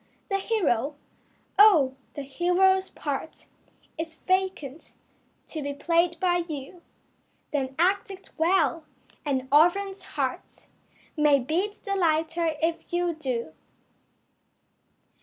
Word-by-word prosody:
The 390 - +2
hero? 300 - 0 0.6
Oh, 320 -11 +7 0.2
the 285 - -4
hero's 360 +7 +2
part 290 +1 -5 0.5
Is 325 0 -4
vacant 370 -5 -2 0.5
to 315 - -6
be 285 0 -4
played 335 +2 +1
by 355 -1 +2
you. 300 +4 -7 0.7
Then 270 -2 -2
act 380 +5 +2
it 385 -1 -11
well! 335 -1 +2 0.4
An 265 -3 -1
orphan's 380 +6 +3
heart - - -4 0.5
May 300 -2 +5
beat 345 +11 -2
the 395 -2 -2
lighter 330 -2 +1
if 330 0 -1
you 350 0 0
do. 255 - -4
330 Hz, 105 wpm, -26 LUFS, 290-375 Hz, 0.7 s, Oh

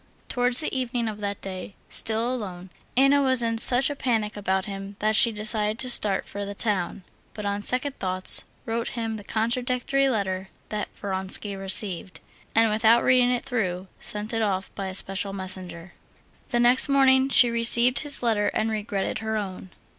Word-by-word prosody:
Towards 245 +1 +2
the 305 - -3
evening 245 -2 -2
of 210 -1 -5
that 200 -1 -5
day, 190 0 -7
still 225 +3 -1
alone, 185 -6 -7 0.3
Anna 275 +2 +4
was 260 -3 +1
in 230 -1 0
such 245 +3 +4
a 290 - -3
panic 225 -6 -1
about 190 -1 -1
him 195 -1 -7
that 215 +1 0
she 230 - +6
decided 215 0 -2
to 255 0 +1
start 200 -5 +1
for 205 - -6
the 200 0 -6
town, 195 -4 -1 0.3
but 210 - -6
on 200 0 -2
second 260 +5 +2
thoughts 185 0 +4 0.2
wrote 230 +1 -3
him 225 -1 -3
the 205 - -10
contradictory 250 +5 -1
letter 190 -5 -2 0.2
that 210 -1 -4
Vronsky 195 +1 -2
received, 190 -2 +1 0.4
and 225 -1 +4
without 220 +2 +4
reading 250 -1 +4
it 245 -1 -1
through, 190 -8 -2
sent 210 +2 -4
it 225 - -1
off 195 -3 -2
by 195 - -5
a 190 - -5
special 195 +1 -3
messenger. 185 -2 -6 0.6
The 240 - 0
next 245 +4 +4
morning 265 -1 +4
she 245 -3 +6
received 235 +2 +5
his 290 -4 -5
letter 215 -3 +1
and 220 +1 0
regretted 205 -2 -3
her 220 0 -3
own. 190 -2 -6
220 Hz, 175 wpm, -25 LUFS, 195-245 Hz, 0.6 s, she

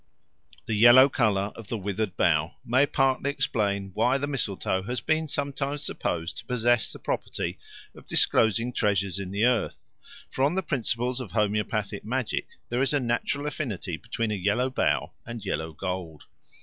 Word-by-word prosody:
The 110 - -2
yellow 120 +5 +8
colour 105 -6 +1
of 115 -3 -10
the 115 - -2
withered 100 0 -3
bough 80 -2 +2
may 130 +4 +3
partly 135 0 +1
explain 100 -8 -1
why 120 +6 +2
the 140 - -2
mistletoe 105 -9 -1
has 125 +6 -3
been 160 0 0
sometimes 140 0 -2
supposed 85 - -2
to 120 - -11
possess 120 -1 +2
the - - -7
property - - -3 0.3
of - - -15
disclosing 115 +3 +2
treasures 100 -3 +1
in 95 -2 -5
the 100 +4 +1
earth; 125 -4 +2 0.6
for 130 - -1
on 145 +5 +2
the 190 - 0
principles 125 -3 -1
of 115 -8 -7
homoeopathic 105 -1 -1
magic 125 +2 -2 0.2
there 120 +2 0
is 135 - +1
a 145 - +3
natural 130 +3 -1
affinity 110 - -3
between 110 +4 -3
a - - 0
yellow 105 +7 0
bough - - +1
and 120 -3 -7
yellow 80 -4 -2
gold. 90 -2 -5
115 Hz, 165 wpm, -27 LUFS, 100-130 Hz, 0.6 s, yellow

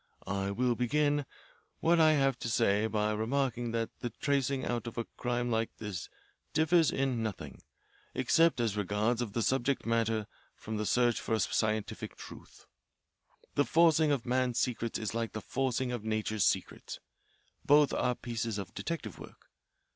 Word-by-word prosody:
I 100 0 -2
will 125 +5 +1
begin 145 +4 +1 0.5
what 170 +1 +3
I 155 -1 +6
have 135 -4 +2
to 115 - -3
say 105 -1 +2
by 105 -1 0
remarking 120 +2 -1
that 115 -1 -1
the 120 - -3
tracing 140 +2 0
out 120 0 -2
of 115 - -7
a 115 - -1
crime 120 0 -1
like 115 0 -1
this 105 -5 -5 0.4
differs 160 0 +4
in 135 -3 0
nothing, 75 - -5 0.5
except 165 -4 +3
as 115 -4 0
regards 105 +4 0
the 115 0 -2
subject 135 +2 0
matter, 115 -2 +1 0.3
from 110 0 -5
the 105 0 -2
search 120 +3 +2
for 110 - 0
a - - -1
scientific 110 +1 -1
truth. - - -12 0.9
The 145 - +3
forcing 160 -1 +4
of 135 -4 0
man's 125 -1 +1
secrets 115 -2 -1
is 110 -1 -3
like 115 -1 -2
the 110 - -3
forcing 130 +2 -1
of 120 -3 -4
nature's 110 -2 0
secrets. - - -1 0.6
Both 145 -1 +5
are 125 - +1
pieces 115 -3 -3
of 95 -3 -6
detective 110 - -5
work. - - -13
120 Hz, 160 wpm, -31 LUFS, 110-135 Hz, 0.9 s, I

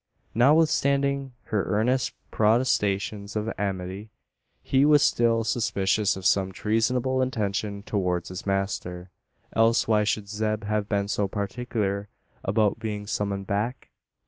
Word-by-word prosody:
Notwithstanding 140 0 +3
her 105 -2 -1
earnest 120 +5 +1 0.2
protestations 105 -3 +1
of 110 +1 -2
amity, 95 +1 -4 0.5
he 135 0 +3
was 150 -1 +5
still 115 -1 +3
suspicious 105 -3 +1
of 95 - -8
some 95 -1 +3
treasonable 125 +6 0
intention 105 -4 -2
towards 90 -5 -1
his 90 0 -6
master; 95 -2 -2 0.4
else 115 +1 +3
why 105 -1 +3
should 105 -1 -1
Zeb 110 +1 -2
have 105 0 -1
been 100 -1 0
so 100 0 0
particular 100 -1 -3 0.3
about 105 +1 +1
being 105 -2 -4
summoned 100 -1 -2
back? 105 +6 -3
105 Hz, 120 wpm, -26 LUFS, 100-115 Hz, 0.5 s, was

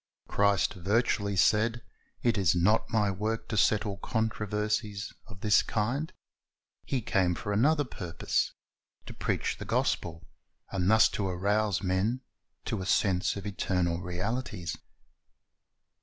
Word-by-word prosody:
Christ 100 -3 +2
virtually 100 +2 0
said, 110 +4 +3 0.4
It 120 -1 +3
is 95 -4 +3
not 100 +6 +2
My 105 -3 +2
work 110 +4 -2
to 115 - -2
settle 100 0 +2
controversies 105 -2 -2
of 100 -4 -13
this 105 -1 +5
kind. 125 +9 -1 0.7
He 130 -4 -2
came 90 -4 +1
for 105 +4 -3
another 145 +8 +3
purpose, 90 - -2 0.5
to - - -8
preach - - -1
the - - -6
gospel, 85 -1 -1 0.4
and 95 -1 0
thus 110 -1 +7
to 100 - -2
arouse 100 +2 0
men 100 +7 0 0.4
to 110 - -2
a - - -4
sense 95 -3 +2
of 100 0 -6
eternal 90 -3 -1
realities. 90 0 -3
100 Hz, 125 wpm, -29 LUFS, 95-110 Hz, 0.7 s, thus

